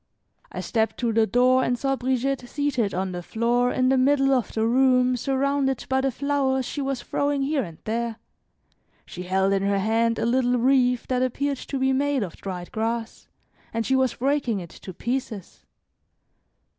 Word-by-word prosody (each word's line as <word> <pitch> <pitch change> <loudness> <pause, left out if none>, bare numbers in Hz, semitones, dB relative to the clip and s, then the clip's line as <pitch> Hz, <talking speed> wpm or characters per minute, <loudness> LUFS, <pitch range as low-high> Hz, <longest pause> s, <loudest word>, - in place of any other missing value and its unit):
I - - -5
stepped 225 -1 -1
to 235 -2 -1
the 220 0 +3
door 255 +4 +3
and 245 - 0
saw 270 +2 0
Brigitte 260 0 -1
seated 270 -8 -1
on 190 +1 -2
the 175 -1 -5
floor 240 +6 +1
in 255 0 +1
the 265 0 +3
middle 270 +1 +3
of 250 -4 0
the 220 0 0
room 255 +1 +3
surrounded 270 +1 0
by 265 0 +2
the 270 - +1
flowers 270 -1 0
she 285 - -4
was 270 -3 -3
throwing 285 -1 -1
here 285 0 0
and 165 -5 -9
there. 230 +1 -2 0.9
She 180 - -8
held 190 +2 +1
in 195 - +1
her 200 0 +1
hand 225 +3 +1
a - - -1
little 245 +1 +2
wreath 250 0 +2
that 255 -1 +1
appeared 275 +2 -1
to 275 - -5
be 265 0 +1
made 280 -2 +1
of 175 -5 -7
dried 180 -2 -6
grass, 225 +1 -3 0.4
and 230 0 -2
she 265 - +2
was 260 -1 +1
breaking 260 -5 0
it 170 -3 -9
to 185 - -10
pieces. 235 -2 -5
250 Hz, 180 wpm, -24 LUFS, 225-270 Hz, 0.9 s, the